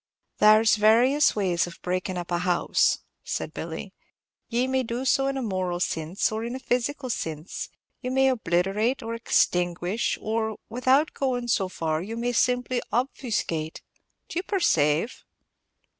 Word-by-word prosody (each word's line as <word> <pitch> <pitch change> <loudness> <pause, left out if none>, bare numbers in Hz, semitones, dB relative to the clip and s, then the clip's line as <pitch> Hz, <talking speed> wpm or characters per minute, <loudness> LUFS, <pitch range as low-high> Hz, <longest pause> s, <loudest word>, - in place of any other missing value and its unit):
"There 215 +1 +6
's 220 - +5
various 240 +8 +4
ways 185 -4 +1
of 170 - -11
breakin' 185 +1 -2
up 175 0 -5
a 175 - +1
house," 180 -1 +2 0.2
said - - -4
Billy. - - -6 0.6
"Ye 245 +2 +1
may 260 0 +1
do 245 +1 -3
so 270 +1 +3
in 275 0 -1
a 265 - -2
moral 185 -4 -2
sinse, 165 +3 -1
or 220 +1 -3
in 240 +2 -4
a - - -5
physical 255 +1 -1
sinse; 160 -3 -4 0.3
you 250 - -3
may 265 +1 +3
obliterate, 210 +2 0
or 225 0 -4
extinguish, 180 -2 +1
or, 220 0 -2
without 260 +5 +2
going 245 -3 -1
so 190 -4 +1
far, 160 -3 -2
you 220 +5 -6
may 240 +1 -1
simply 250 +1 +1
obfuscate, 220 - -2 0.4
do 340 - -3
you - - -4
perceave?" 195 - +1
225 Hz, 155 wpm, -26 LUFS, 180-255 Hz, 0.6 s, There